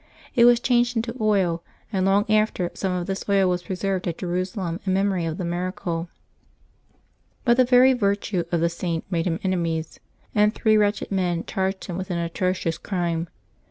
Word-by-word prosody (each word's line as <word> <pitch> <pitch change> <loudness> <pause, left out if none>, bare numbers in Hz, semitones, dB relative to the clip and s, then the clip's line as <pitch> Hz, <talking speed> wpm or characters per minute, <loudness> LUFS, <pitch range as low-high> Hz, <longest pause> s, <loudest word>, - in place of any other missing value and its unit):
It 235 -3 +5
was 240 -1 +6
changed 245 0 +2
into 230 +1 -2
oil, 190 -6 +2 0.3
and 190 -1 +1
long 200 +2 +3
after 215 -5 +1
some 190 - -2
of 180 -1 -2
this 195 +1 -4
oil 195 -1 +4
was 180 -1 0
preserved 190 0 -2
at 170 - -2
Jeru 180 0 -1
salem 180 -2 -4
in 190 - 0
memory 190 -3 +1
of 160 0 -3
the 185 - -3
miracle. 175 -1 -3 1.4
But 240 -1 +4
the 255 - +5
very 255 +1 +6
virtue 200 -5 0
of 170 -2 +1
the 170 - +3
Saint 170 -1 -3
made 170 0 0
him 165 -1 -1
enemies, 165 -4 -2 0.3
and 210 +1 +3
three 220 -2 +3
wretched 205 -1 +1
men 180 -3 0
charged 190 0 -2
him 175 - -5
with 190 - -5
an 175 - -1
atrocious 170 0 -1
crime. 170 -3 -2
185 Hz, 185 wpm, -24 LUFS, 175-210 Hz, 1.4 s, was